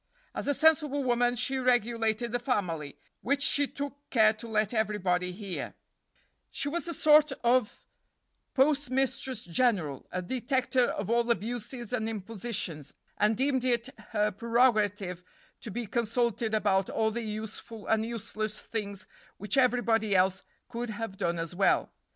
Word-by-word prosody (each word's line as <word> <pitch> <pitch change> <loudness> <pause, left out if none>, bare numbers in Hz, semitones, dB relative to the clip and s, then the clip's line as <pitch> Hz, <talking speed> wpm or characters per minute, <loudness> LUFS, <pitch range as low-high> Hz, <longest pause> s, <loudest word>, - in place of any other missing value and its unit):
As - - -4
a 285 - +2
sensible 300 -2 +3
woman 245 -1 +2
she 260 +3 0
regulated 235 -2 +1
the 245 - 0
family, 175 - -2 0.2
which 280 +3 +1
she 285 0 +3
took 285 +1 -7
care 220 -3 +5
to 225 +2 -10
let 215 0 0
everybody 190 -5 0
hear; 195 0 -6 0.7
she - - -3
was 340 +3 -3
a 340 - -3
sort 300 0 +5
of 240 -2 +1 0.7
postmistress 265 -3 +1
general, 175 - 0
a 185 0 -3
detector 255 +3 +1
of 200 -1 -3
all 235 0 +2
abuses 235 +1 -2
and 225 -2 -1
impositions, 200 - -3 0.2
and 210 +1 +3
deemed 265 -1 +1
it 245 0 +1 0.2
her 210 -1 +1
prerogative 210 -5 +1 0.4
to - - -8
be 235 +3 -4
consulted 235 -1 0
about 195 -3 +2
all 220 0 +1
the 235 +2 -3
useful 220 0 -6
and 220 0 +2
useless 220 -2 -4
things 200 -3 -5 0.3
which 205 0 -1
everybody 235 -5 +2
else 185 0 +3 0.3
could 240 0 -5
have 215 -2 -5
done 170 -2 -1
as 165 +1 -4
well. 195 +1 +2
225 Hz, 145 wpm, -29 LUFS, 205-250 Hz, 0.7 s, care